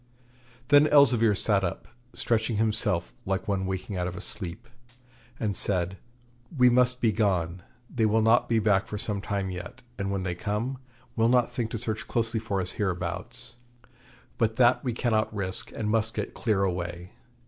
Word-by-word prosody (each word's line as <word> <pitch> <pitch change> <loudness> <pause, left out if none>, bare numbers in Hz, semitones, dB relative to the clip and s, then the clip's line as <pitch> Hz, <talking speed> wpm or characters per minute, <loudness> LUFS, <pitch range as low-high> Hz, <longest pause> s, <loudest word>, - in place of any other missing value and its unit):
Then 145 +1 +7
Elzevir 120 -8 +5
sat 100 0 +2
up, 90 - -4 0.3
stretching 115 0 0
himself 110 -5 +1
like 95 0 -2
one 95 -2 -1
waking 95 +1 -4
out 90 0 -1
of 90 +3 -6
sleep, 105 +3 -7 0.7
and 105 -3 -1
said: 90 0 +1 0.6
'We 125 -1 +6
must 125 0 +2
be 115 - +3
gone. 90 -4 0 0.3
They 115 -3 +1
will 110 +1 +2
not 120 +2 +3
be 115 - +3
back 105 -2 +2
for 105 - -5
some 105 -1 -2
time 100 -2 -2
yet, 90 +8 -8 0.2
and, 100 0 -2
when 100 -1 -2
they 90 -1 -2
come, 105 +8 -3 0.4
will 115 0 +3
not 125 -1 +3
think 120 -4 -2
to 115 - -4
search 110 -1 -3
closely 115 -1 -1
for 105 -3 -2
us 90 0 -1
hereabouts; 105 +6 -4 0.8
but 110 -1 +1
that 120 +1 +4
we 125 - -1
cannot 110 -2 0
risk, 95 -3 -3
and 105 -1 -2
must 110 0 0
get 105 - -3
clear 105 -4 0
away. 90 -1 -3
105 Hz, 170 wpm, -27 LUFS, 95-115 Hz, 0.8 s, Then